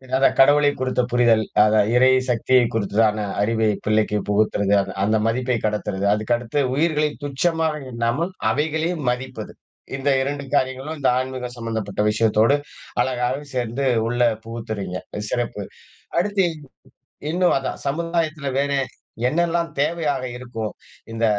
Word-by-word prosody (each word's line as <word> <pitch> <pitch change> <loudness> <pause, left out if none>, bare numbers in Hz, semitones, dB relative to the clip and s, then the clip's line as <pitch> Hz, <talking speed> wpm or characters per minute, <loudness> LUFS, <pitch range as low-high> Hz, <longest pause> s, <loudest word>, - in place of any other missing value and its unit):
அதான், 135 +1 +3
கடவுளை 145 +2 +6
குறித்த 130 -1 +1
புரிதல். 120 -2 +4 0.2
அத 105 0 +4 0.2
இறை 130 +1 +6 0.2
சக்தியை 125 +1 +3
குறித்ததான 110 0 +1 0.2
அறிவை 110 +1 +2 0.2
பிள்ளைக்கு 110 -1 +2
புகுத்துறது, 105 -1 +2
அத - - -5
அந்த 110 +2 +2
மதிப்பை 125 +1 0
கடத்துறது, 105 -2 -1
அதுக்கடுத்து 120 +5 -1
உயிர்களை 150 +1 +2
துச்சமாக 160 +2 0
எண்ணாமல் 120 +9 -1 0.2
அவைகளையும் 160 +2 -1
மதிப்பது. 125 -3 -4 0.4
இந்த 140 +1 0
2 140 +1 -2
காரியங்களும், 130 +4 -1
இந்த 135 - +3
ஆன்மீகம் 130 -1 -4
சம்மந்தப்பட்ட 110 -3 -3
விஷயத்தோடு, 110 +4 +3 0.5
அழகாவே 130 +2 -1
சேர்ந்து 125 +2 -1 0.2
உள்ள 120 +1 -1 0.2
புகுத்துறீங்க, 110 -5 -5 0.3
சிறப்பு. 120 -4 -2 0.6
அடுத்து 195 0 +1 0.8
இன்னும் 180 +2 +2
அதான், 135 - -5
சமுதாயத்துல 160 0 -1
வேற 140 +1 +1 0.6
என்னெல்லாம் 170 +2 0
தேவையாக 150 -3 0
இருக்கும்? 120 -3 -5 0.4
இந்த 115 0 -1
125 Hz, 120 wpm, -22 LUFS, 110-145 Hz, 0.8 s, கடவுளை